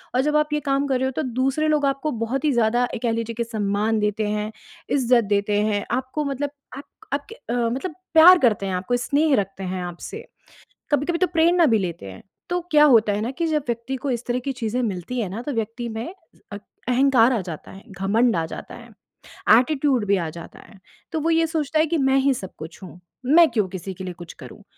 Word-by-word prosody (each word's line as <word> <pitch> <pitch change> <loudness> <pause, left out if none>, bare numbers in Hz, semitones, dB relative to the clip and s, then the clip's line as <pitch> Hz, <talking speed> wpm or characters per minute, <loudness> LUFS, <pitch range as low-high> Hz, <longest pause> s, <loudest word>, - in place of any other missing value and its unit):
और 255 - +4
जब 300 +2 0
आप 300 0 0
ये 300 - +1
काम 275 +1 +1
कर 265 -2 +1
रहे 260 - 0
हो 265 - -1
तो - - -3 0.2
दूसरे 270 +4 +1
लोग 300 -2 +2
आपको 275 +2 -1
बहुत 270 +6 -2
ही 300 - +3
ज़्यादा 240 +1 +2
एक 230 - -6
कह 235 - +1
लीजिए 230 0 -3
कि 235 - -1
सम्मान 215 -1 -1
देते 210 0 0
हैं, 210 +1 -2 0.4
इज़्ज़त 250 -3 +3
देते 205 0 +1
हैं, 205 -1 0
आपको 260 +5 -2
मतलब 280 +1 -2 0.3
आप 280 - -7 0.3
आपके 290 +11 -4
अ, 350 - -7
मतलब 245 +8 -2 0.2
प्यार 335 +3 +9
करते 215 - +2
हैं, 190 - -2
आपको 185 +7 -1
स्नेह 285 +4 +2
रखते 195 -2 -3
हैं 185 0 -3
आपसे। 175 - -7 0.7
कभी-कभी 295 +4 +1
तो 370 - +3
प्रेरणा 340 0 +3
भी 225 -5 +3
लेते 175 - -4
हैं, 95 - -12 0.3
तो 355 0 0
क्या 300 -1 +6
होता 230 -7 +5
है 205 - -1
ना 225 +3 -2
कि 330 +5 -2
जब 305 -2 0
व्यक्ति 235 +3 -3
को 280 - 0
इस 240 -1 -2
तरह 245 0 0
की 275 +2 -3
चीज़ें 250 -1 -2
मिलती 215 +3 -3
हैं 210 - -2
ना, 205 +5 -5
तो 290 - -4
व्यक्ति 230 +1 -3
में 230 +10 -6 0.4
अक 205 - -6 0.3
अहंकार 255 -1 +4
आ 235 - 0
जाता 170 -4 -8
है, 195 - -12 0.2
घमंड 220 +4 +2
आ 165 - 0
जाता - - -9
है। 240 0 -12 0.7
एटीट्यूड 270 -3 +1
भी 200 0 +3
आ 170 -3 -2
जाता 170 - -11
है, 200 - -17 0.3
तो 320 - -1
वो 325 - 0
ये 330 0 +3
सोचता 310 -1 -1
है 310 - +4
कि 335 +2 0
मैं 270 -2 +3
ही 275 0 +3
सब 190 -7 -8
कुछ 160 +1 -9
हूँ, 180 -1 -11 0.3
मैं 320 +5 +6
क्यों 215 -4 +1
किसी 190 +1 -6
के 190 - -9
लिए 180 -1 -5
कुछ 175 -1 -11
करूँ? - - -12
245 Hz, 235 wpm, -23 LUFS, 210-285 Hz, 0.7 s, प्यार